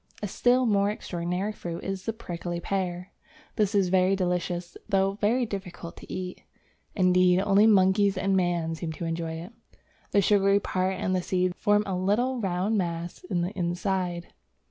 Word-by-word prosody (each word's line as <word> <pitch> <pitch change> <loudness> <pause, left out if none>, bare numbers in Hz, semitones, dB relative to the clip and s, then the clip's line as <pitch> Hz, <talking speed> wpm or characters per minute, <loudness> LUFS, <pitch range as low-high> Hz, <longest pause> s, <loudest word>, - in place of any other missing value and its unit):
A - - 0
still 245 +6 +2
more 200 -3 +3
extraordinary 180 0 -3
fruit 170 -5 -6
is 195 -1 -4
the 225 - 0
prickly 175 -5 -5
pear; 180 0 -3 0.4
this 210 -1 +1
is 195 -3 +3
very 185 +1 +3
delicious 180 -1 -2
though 195 0 +2
very 240 +4 +2
difficult 185 -5 -7
to - - -11
eat. 180 -1 -5 0.5
Indeed, 180 -1 +4
only 200 +2 +4
monkeys 195 -1 +4
and 195 +1 +1
man 175 -3 0
seem 165 0 -5
able 160 - -6
to 170 - -4
enjoy 165 0 -3
it. 170 +7 -8 0.6
The 205 - +3
sugary 200 0 +4
part 190 -1 -1
and 185 0 -1
the 185 - +1
seeds 180 0 0
form 205 +1 +2
a 190 - -2
little 225 +8 +1
round 195 +2 0
mass 170 -1 -4
in 180 -1 -1
the 175 +2 -2
inside. 180 -1 -2
185 Hz, 170 wpm, -27 LUFS, 175-200 Hz, 0.6 s, Indeed